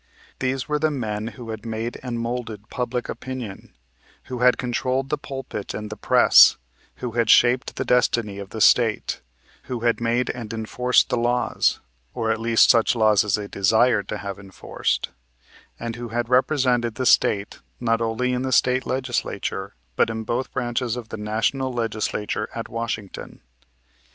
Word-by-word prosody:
These 130 0 -1
were 150 -1 0
the 155 +1 +2
men 110 -6 -3
who 115 -3 -7
had 110 -1 -7
made 115 +1 -4
and 120 -2 -4
molded 115 -3 -5
public 125 0 -2
opinion, 125 - -7 0.5
who 125 -2 -6
had 125 0 +4
controlled 130 +2 -1
the 150 - 0
pulpit 135 -8 -6
and 105 0 -6
the - - -4
press, - - +6 0.4
who 125 - -5
had 115 -1 0
shaped 125 +1 +4
the - - -3
destiny 115 -4 +1
of 100 -1 -8
the 110 - -6
State; 115 -2 +3 0.4
who 125 -3 -4
had 120 0 +1
made 120 +2 +1
and 115 -4 -7
enforced 125 +3 +1
the 125 - 0
laws, 120 +1 +1 0.3
or 110 0 0
at 110 - -1
least 115 0 +5
such 115 0 +3
laws 110 -2 +4
as 105 -2 +1
they 105 -1 -5
desired 105 +2 +2
to 105 - -3
have 100 -1 -6
enforced, 95 -1 -3 0.7
and 115 -1 -4
who 120 0 -6
had 120 +1 -2
represented 125 -3 +2
the 130 - -2
State 105 -4 +2 0.2
not 115 -1 +1
only 115 +3 0
in 125 - -1
the 130 0 -2
State 125 +1 +2
Legislature 130 -2 -3 0.2
but - - +3
in 110 0 -4
both 120 +3 -2
branches 120 -1 -2
of 115 -2 -8
the - - -6
National 115 +5 -1
Legislature 110 -2 -2
at 115 - -4
Washington. 115 -4 -5
120 Hz, 165 wpm, -23 LUFS, 110-125 Hz, 0.7 s, press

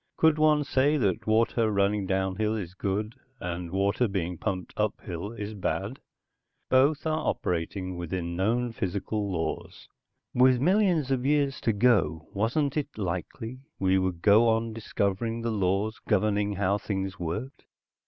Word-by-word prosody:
Could 160 -1 +4
one 155 -1 +4
say 140 +2 +2
that 100 -8 0
water 110 +1 +2
running 100 -1 +1
down 95 0 0
hill 110 0 0
is 90 -5 -5
good, 100 +3 -2 0.3
and 90 0 -4
water 100 +6 +1
being 90 -3 -2
pumped 95 -1 -4
up - - -1
hill 90 +5 -5
is 105 -1 -5
bad? 100 +4 -3 0.7
Both 140 +4 +4
are 155 0 -1
operating 90 +2 -2
within 85 0 -3
known 115 +6 0
physical 100 0 -2
laws. 80 -3 -4 0.5
With 125 0 +5
millions 175 - +2
of 130 -2 +1
years 140 -1 +1
to 115 - +2
go, 100 -9 +2
wasn't 130 +8 0
it 145 -4 -3
likely 105 +6 -4 0.2
we 95 0 +2
would 90 -2 -2
go 110 +3 +6
on 115 0 0
discovering 115 +1 -2
the 115 - 0
laws 100 +2 0
governing 105 0 +1
how 100 +1 +1
things 95 -1 -3
worked? 105 - -5
105 Hz, 150 wpm, -27 LUFS, 95-125 Hz, 0.7 s, go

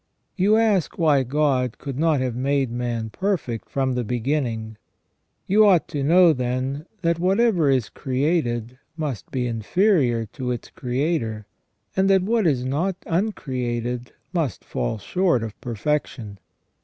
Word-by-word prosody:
You 205 +4 +4
ask 215 -6 +2
why 150 -5 +4
God 130 -2 0
could 140 -2 -6
not 160 -4 +2
have 125 -3 -2
made 135 0 0
man 120 -2 -3
perfect 165 - -2
from 135 -1 0
the 125 0 -1
beginning? 115 -2 -2 0.7
You 210 +3 +5
ought 180 -5 +4
to 150 -4 -3
know, 170 +4 +6
then, 130 +4 -2 0.2
that 170 0 +1
whatever 185 -3 +3
is 130 -5 +2
created 130 -4 -1 0.2
must 145 -9 -4
be 125 -2 -2
inferior 120 - +2
to 125 +3 -6
its 120 -2 -4
Creator, 125 -4 -2 0.5
and 190 +1 +3
that 190 -1 +4
what 220 -1 +2
is 130 -5 +1
not 165 +9 0
uncreated 125 - -2 0.2
must 155 - -1
fall 65 - -2
short 170 - +1
of 110 -2 -7
perfection. 115 -3 -3
135 Hz, 140 wpm, -23 LUFS, 120-170 Hz, 0.7 s, know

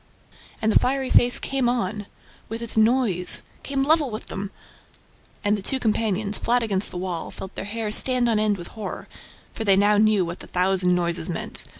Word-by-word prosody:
And 220 - +3
the - - +6
fiery 265 0 -1
face 245 0 +5
came 270 -3 0
on... 210 -4 -2 0.4
with 225 +2 -5
its 235 - -4
noise... 220 -5 +2 0.2
came 275 -1 -1
level 305 -1 +3
with 215 -1 -7
them!... 195 +1 -5 0.9
And 205 0 +2
the 205 - -5
two 265 +7 0
companions, 215 -2 0
flat 240 0 +1
against 200 -3 -1
their 175 - -6
wall, 180 -2 -3
felt 190 - -9
their - - -6
hair 215 +1 -4
stand 250 +2 +3
on 225 -2 +2
end 210 -1 +1
with 175 - -8
horror, 215 -3 -7 0.5
for - - -4
they 195 -3 +4
now 205 +1 +4
knew 215 -3 +3
what 170 +1 -6
the - - -10
thousand 180 0 +2
noises 175 +1 -1
meant. 170 - -3
215 Hz, 195 wpm, -23 LUFS, 190-240 Hz, 0.9 s, the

